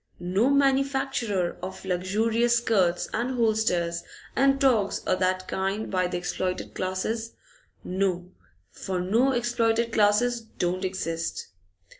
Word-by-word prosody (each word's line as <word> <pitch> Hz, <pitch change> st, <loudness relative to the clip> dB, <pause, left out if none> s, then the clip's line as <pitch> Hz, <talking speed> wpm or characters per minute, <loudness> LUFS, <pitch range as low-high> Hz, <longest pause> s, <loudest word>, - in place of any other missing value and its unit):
No 190 Hz, +8 st, +1 dB
manufacture 270 Hz, -8 st, +1 dB
of 185 Hz, +1 st, -7 dB
luxurious 220 Hz, +6 st, +1 dB
skirts 195 Hz, -7 st, +1 dB
and 245 Hz, +3 st, -1 dB
hulsters 195 Hz, -7 st, +1 dB, 0.3 s
and 275 Hz, +1 st, +3 dB
togs 235 Hz, -8 st, +2 dB
o' -, -, +2 dB
that 185 Hz, 0 st, 0 dB
kind 195 Hz, +3 st, -2 dB
by 185 Hz, -2 st, +1 dB
the 180 Hz, -, -3 dB
exploited 180 Hz, +1 st, -3 dB
classes. 220 Hz, +5 st, -3 dB, 0.5 s
No, 180 Hz, -1 st, -1 dB, 0.4 s
for 185 Hz, -1 st, -4 dB
no 225 Hz, +9 st, +2 dB
exploited 235 Hz, -2 st, +1 dB
classes 230 Hz, +3 st, +3 dB
don't 185 Hz, -4 st, -3 dB
exist! 165 Hz, -3 st, -3 dB
205 Hz, 115 wpm, -26 LUFS, 185-235 Hz, 0.5 s, and